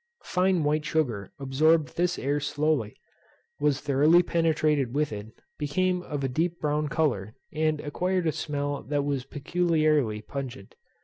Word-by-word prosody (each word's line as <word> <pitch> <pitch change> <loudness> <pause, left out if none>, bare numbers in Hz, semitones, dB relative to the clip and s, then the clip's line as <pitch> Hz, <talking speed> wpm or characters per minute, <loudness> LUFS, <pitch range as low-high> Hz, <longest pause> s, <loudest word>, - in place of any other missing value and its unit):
Fine 180 -2 +2
white 150 +1 +1
sugar 125 -11 -1
absorbed 150 +3 +2
this 180 +1 +1
air 145 +2 0
slowly, 145 -6 0 0.6
was 145 -1 +1
thoroughly 150 +5 +4
penetrated 155 -6 +1
with 150 -5 0
it, 105 0 -6 0.3
became 180 +5 0
of 145 -5 -4
a - - +1
deep 165 +6 -1
brown 150 0 0
colour, 130 -10 -1 0.2
and 155 0 +1
acquired 180 +5 -1
a 160 - +2
smell 145 -2 -3
that 145 0 -1
was 140 -3 -1
peculiarly 155 -6 +1
pungent. 130 -8 -7
150 Hz, 140 wpm, -27 LUFS, 140-160 Hz, 0.6 s, thoroughly